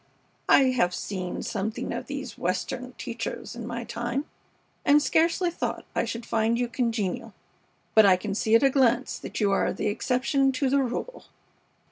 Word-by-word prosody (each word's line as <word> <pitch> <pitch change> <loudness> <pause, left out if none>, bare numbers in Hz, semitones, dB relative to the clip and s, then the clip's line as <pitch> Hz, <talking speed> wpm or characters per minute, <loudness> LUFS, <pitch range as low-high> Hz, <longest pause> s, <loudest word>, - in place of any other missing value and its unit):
I 265 -2 +6
have 180 -8 +1
seen 185 -2 -4
something 215 +2 -3
of - - -5
these 275 -3 -5
Western 190 +8 -3
teachers 235 -1 -5
in 235 -1 -6
my 240 0 -4
time, 240 +4 -3 0.6
and 290 +1 +6
scarcely 335 +4 +2
thought - - -4
I - - 0
should 230 0 -5
find 225 +1 +1
you 245 0 0
congenial; 230 -5 -2 0.6
but 220 -2 +7
I 185 -1 +6
can 200 +2 -4
see 220 +2 +2
at 230 - +5
a 270 - +5
glance 255 -1 +2
that - - -6
you 205 -3 +2
are 195 - +2
the - - -1
exception 265 +5 +1
to 260 0 0
the 280 0 +4
rule." 265 - -4
235 Hz, 170 wpm, -26 LUFS, 220-265 Hz, 0.6 s, but